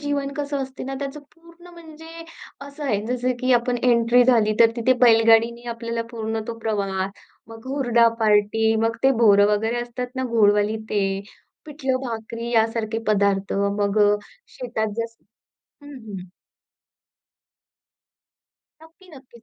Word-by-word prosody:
जीवन 285 Hz, -1 st, -2 dB
कसं 285 Hz, -1 st, -3 dB
असते 265 Hz, 0 st, -8 dB
ना, 270 Hz, -, -5 dB
त्याचं 280 Hz, +1 st, -5 dB
पूर्ण 335 Hz, +1 st, -18 dB
म्हणजे 330 Hz, 0 st, -12 dB, 0.4 s
असं 285 Hz, +1 st, -9 dB
आहे, 210 Hz, -7 st, 0 dB
जसं 250 Hz, +1 st, -1 dB
की 255 Hz, 0 st, +2 dB
आपण 245 Hz, 0 st, +1 dB
एंट्री 240 Hz, 0 st, +4 dB
झाली, 220 Hz, -4 st, +3 dB
तर 230 Hz, -1 st, +7 dB
तिथे 235 Hz, +2 st, +2 dB
बैलगाडीने 230 Hz, +1 st, +4 dB
आपल्याला 230 Hz, 0 st, -4 dB
पूर्ण 225 Hz, -1 st, -4 dB
तो 230 Hz, -1 st, -6 dB
प्रवास. 195 Hz, -4 st, -2 dB, 0.4 s
मग 225 Hz, +1 st, -12 dB
हुरडा 240 Hz, -4 st, +3 dB
पार्टी, 220 Hz, +1 st, +2 dB
मग 225 Hz, 0 st, 0 dB
ते 270 Hz, -, +5 dB
बोरं 205 Hz, -2 st, +6 dB
वगैरे 225 Hz, +3 st, -1 dB
असतात 245 Hz, +1 st, -6 dB
ना 260 Hz, -, -1 dB
गोडवाली 210 Hz, -1 st, +3 dB
ते, 205 Hz, -2 st, +1 dB, 0.6 s
पिठलं-भाकरी 250 Hz, -5 st, -4 dB
यासारखे 225 Hz, -1 st, 0 dB
पदार्थ. 200 Hz, -2 st, +1 dB, 0.3 s
मग 205 Hz, +1 st, 0 dB
अ, -, -, +1 dB, 0.4 s
शेतात 235 Hz, -3 st, -3 dB
जसं 230 Hz, 0 st, -6 dB, 0.6 s
हं, 290 Hz, -, -11 dB
हं. 190 Hz, -3 st, -8 dB, 2.6 s
नक्की. 330 Hz, +4 st, -19 dB
नक्कीच. 250 Hz, -3 st, -17 dB
235 Hz, 135 wpm, -22 LUFS, 220-265 Hz, 2.6 s, तर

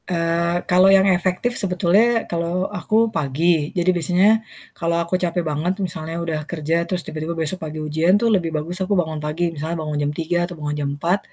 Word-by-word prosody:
Eee, 170 Hz, 0 st, 0 dB
kalau 185 Hz, +2 st, +5 dB
yang 195 Hz, 0 st, +6 dB
efektif 185 Hz, +7 st, 0 dB
sebetulnya 200 Hz, +5 st, +2 dB
kalau 170 Hz, +2 st, -2 dB
aku 220 Hz, +4 st, +1 dB
pagi. 155 Hz, +1 st, +1 dB
Jadi 175 Hz, +1 st, +2 dB
biasanya 180 Hz, +4 st, +3 dB, 0.4 s
kalau 170 Hz, -1 st, -1 dB
aku 170 Hz, +1 st, -2 dB
capek 175 Hz, -1 st, -1 dB
banget 155 Hz, +4 st, -1 dB
misalnya 165 Hz, -4 st, -4 dB
udah 165 Hz, -2 st, -2 dB
kerja 160 Hz, -1 st, -1 dB
terus 180 Hz, -2 st, 0 dB
tiba-tiba 160 Hz, +2 st, -5 dB
besok 165 Hz, +3 st, -1 dB
pagi 155 Hz, -1 st, -6 dB
ujian 160 Hz, +5 st, +2 dB
tuh 230 Hz, +1 st, +2 dB
lebih 175 Hz, -4 st, +1 dB
bagus 175 Hz, +5 st, -4 dB
aku 190 Hz, +1 st, +1 dB
bangun 160 Hz, -3 st, -1 dB
pagi 165 Hz, +3 st, -2 dB
misalnya 160 Hz, +2 st, -4 dB
bangun 150 Hz, -1 st, -3 dB
jam 145 Hz, 0 st, 0 dB
3.00 165 Hz, +2 st, 0 dB
atau 175 Hz, -, -9 dB
bangun 150 Hz, -1 st, -3 dB
jam 140 Hz, -, -1 dB
4.00 175 Hz, +6 st, +1 dB
170 Hz, 190 wpm, -21 LUFS, 160-185 Hz, 0.4 s, yang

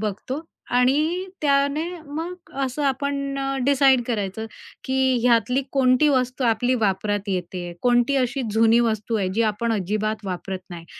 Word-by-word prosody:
बघतो 220 Hz, +8 st, -4 dB, 0.3 s
आणि 305 Hz, +8 st, +2 dB, 0.2 s
त्याने 280 Hz, +1 st, +2 dB, 0.2 s
मग 330 Hz, +3 st, -6 dB
असं 270 Hz, +2 st, -2 dB
आपण 275 Hz, 0 st, -1 dB
अ, 275 Hz, 0 st, -2 dB
डिसाईड 270 Hz, -2 st, +4 dB
करायचं, 220 Hz, -2 st, -3 dB, 0.4 s
की 260 Hz, -1 st, +2 dB
ह्यातली 245 Hz, +2 st, +3 dB
कोणती 265 Hz, +2 st, +4 dB
वस्तू 255 Hz, -1 st, 0 dB
आपली 240 Hz, +2 st, +2 dB
वापरात 205 Hz, -1 st, -1 dB
येते, 180 Hz, -1 st, -3 dB
कोणती 245 Hz, +2 st, +3 dB
अशी 255 Hz, 0 st, 0 dB
जुनी 225 Hz, +2 st, +4 dB
वस्तू 225 Hz, -1 st, 0 dB
आहे, 195 Hz, -3 st, 0 dB
जी 230 Hz, -, +2 dB
आपण 225 Hz, +2 st, -2 dB
अजिबात 215 Hz, +2 st, -2 dB
वापरत 190 Hz, 0 st, -4 dB
नाही 170 Hz, -1 st, -8 dB
245 Hz, 140 wpm, -23 LUFS, 215-275 Hz, 0.4 s, डिसाईड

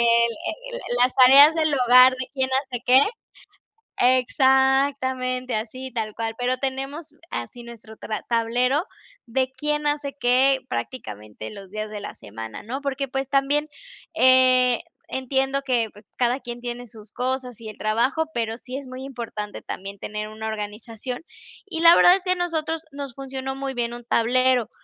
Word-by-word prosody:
el 235 Hz, -, +1 dB
el 245 Hz, -, -4 dB
las 250 Hz, +1 st, +4 dB
tareas 275 Hz, +4 st, +8 dB
del 310 Hz, -2 st, +1 dB
hogar, 255 Hz, 0 st, +7 dB
de 255 Hz, 0 st, -4 dB
quién 265 Hz, -2 st, -1 dB
hace 250 Hz, -4 st, -7 dB
qué. 255 Hz, +2 st, +7 dB, 1.0 s
Exactamente, 260 Hz, 0 st, +2 dB
así 255 Hz, +4 st, -5 dB
tal 220 Hz, -3 st, -3 dB
cual. 225 Hz, 0 st, -4 dB
Pero 250 Hz, +1 st, 0 dB
tenemos 275 Hz, +4 st, -4 dB, 0.2 s
así 240 Hz, -1 st, -6 dB
nuestro 230 Hz, -2 st, -12 dB
tra 215 Hz, -, -4 dB
tablero 245 Hz, +5 st, +1 dB, 0.4 s
de 260 Hz, +2 st, -1 dB
quién 300 Hz, 0 st, -1 dB
hace 290 Hz, -1 st, -1 dB
qué, 260 Hz, +2 st, +4 dB
prácticamente 110 Hz, -, -6 dB
los 195 Hz, -2 st, -11 dB
días 215 Hz, 0 st, -4 dB
de 210 Hz, -1 st, -6 dB
la -, -, -7 dB
semana, 110 Hz, +1 st, -9 dB
¿no?, 260 Hz, +6 st, -5 dB
porque, 275 Hz, -1 st, -2 dB
pues, 270 Hz, +1 st, -3 dB
también, 280 Hz, +2 st, +1 dB, 0.5 s
eh, 255 Hz, -3 st, +5 dB, 0.3 s
entiendo 265 Hz, +1 st, -1 dB
que, 245 Hz, -4 st, 0 dB
pues, 205 Hz, +1 st, -17 dB
cada 245 Hz, +1 st, +1 dB
quien 240 Hz, 0 st, -7 dB
tiene 245 Hz, 0 st, -5 dB
sus 215 Hz, -1 st, -13 dB
cosas 255 Hz, -1 st, -3 dB
y 220 Hz, -, -7 dB
el 215 Hz, -, -11 dB
trabajo, 235 Hz, +9 st, +1 dB
pero 225 Hz, -1 st, -2 dB
sí 255 Hz, +1 st, -7 dB
es 275 Hz, -, -8 dB
muy 255 Hz, +1 st, -8 dB
importante 230 Hz, -6 st, -6 dB
también 195 Hz, +1 st, -7 dB
tener 210 Hz, +1 st, -5 dB
una 220 Hz, +1 st, -6 dB
organización, 220 Hz, +3 st, -6 dB, 0.5 s
y 345 Hz, -5 st, -4 dB
la 335 Hz, +1 st, +9 dB
verdad 355 Hz, -, +7 dB
es 380 Hz, -, -11 dB
que 365 Hz, -, +1 dB
a 370 Hz, -, +3 dB
nosotros 325 Hz, -2 st, -2 dB
nos 280 Hz, -3 st, -7 dB
funcionó 265 Hz, 0 st, -5 dB
muy 270 Hz, 0 st, -4 dB
bien 235 Hz, -1 st, -2 dB
un 240 Hz, 0 st, -8 dB
tablero, 250 Hz, +1 st, +2 dB
255 Hz, 165 wpm, -23 LUFS, 230-270 Hz, 1.0 s, la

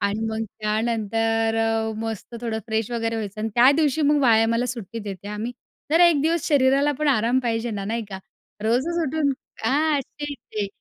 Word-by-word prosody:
आणि 200 Hz, +2 st, -1 dB
मग 220 Hz, 0 st, -2 dB, 0.2 s
त्यानंतर 225 Hz, +1 st, 0 dB
अ, 225 Hz, 0 st, 0 dB
मस्त 225 Hz, +1 st, -5 dB
थोडं 230 Hz, -2 st, -2 dB
फ्रेश 220 Hz, 0 st, -1 dB
वगैरे 230 Hz, -1 st, -1 dB
व्हायचं 210 Hz, -1 st, -5 dB
आणि 220 Hz, -, -1 dB
त्या 245 Hz, +3 st, +7 dB
दिवशी 310 Hz, -1 st, +2 dB
मग 295 Hz, +1 st, +4 dB
व्यायामाला 225 Hz, -3 st, +5 dB
मला 245 Hz, +1 st, 0 dB
सुट्टी 230 Hz, -2 st, -6 dB
देते 200 Hz, -2 st, -7 dB
हं 210 Hz, 0 st, -5 dB
मी. 245 Hz, +2 st, -3 dB, 0.4 s
जरा 345 Hz, +3 st, +6 dB
1 310 Hz, -5 st, +3 dB
दिवस 330 Hz, 0 st, +1 dB
शरीराला 280 Hz, 0 st, +3 dB
पण 305 Hz, -1 st, +1 dB
आराम 245 Hz, -1 st, +3 dB
पाहिजे 230 Hz, 0 st, -1 dB
ना, 200 Hz, -2 st, -4 dB
नाही 230 Hz, +2 st, -2 dB
का? 190 Hz, -2 st, -6 dB, 0.4 s
रोजच 260 Hz, +10 st, +1 dB
उठून 285 Hz, 0 st, +1 dB, 0.3 s
हां, 295 Hz, +1 st, +2 dB
तेच 290 Hz, +2 st, -7 dB, 0.2 s
ते. 210 Hz, -2 st, -1 dB
230 Hz, 190 wpm, -23 LUFS, 220-280 Hz, 0.4 s, त्या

